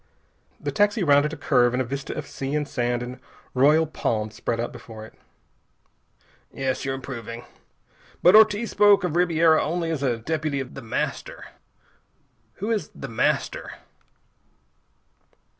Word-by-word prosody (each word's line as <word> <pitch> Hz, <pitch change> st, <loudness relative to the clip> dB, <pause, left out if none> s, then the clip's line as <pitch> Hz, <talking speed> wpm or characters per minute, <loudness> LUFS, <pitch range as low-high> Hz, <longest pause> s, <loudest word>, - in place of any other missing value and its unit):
The -, -, -3 dB
taxi 205 Hz, -1 st, +2 dB
rounded 145 Hz, -1 st, +4 dB
a 160 Hz, -, -7 dB
curve 125 Hz, -4 st, +2 dB
and 125 Hz, -, 0 dB
a 130 Hz, -, 0 dB
vista 140 Hz, +3 st, -5 dB
of -, -, -4 dB
sea 135 Hz, +2 st, -4 dB
and 150 Hz, -1 st, -1 dB
sand 120 Hz, -1 st, -1 dB
and 125 Hz, +1 st, -8 dB, 0.3 s
royal 150 Hz, +5 st, +4 dB
palms 110 Hz, -8 st, -2 dB
spread 115 Hz, +1 st, -3 dB
out 120 Hz, -, -2 dB
before 110 Hz, -1 st, -10 dB
it. -, -, -15 dB, 1.4 s
"Yes, 130 Hz, -1 st, -2 dB
you're 135 Hz, -1 st, -2 dB
improving. 120 Hz, -3 st, -7 dB, 0.8 s
But 180 Hz, +4 st, +7 dB
Ortiz 215 Hz, +1 st, +5 dB
spoke 205 Hz, -1 st, +5 dB
of 175 Hz, -3 st, -1 dB
Ribiera 165 Hz, -2 st, +4 dB
only 165 Hz, +1 st, -2 dB
as 155 Hz, -4 st, -2 dB
a 125 Hz, -4 st, 0 dB
deputy 150 Hz, +3 st, -2 dB
of 135 Hz, -1 st, -6 dB
The 135 Hz, -, -8 dB
Master. 115 Hz, -, -4 dB, 1.0 s
Who 210 Hz, +4 st, -4 dB
is 220 Hz, -3 st, -1 dB
The -, -, -7 dB
Master?" -, -, -1 dB
140 Hz, 145 wpm, -24 LUFS, 125-170 Hz, 1.4 s, But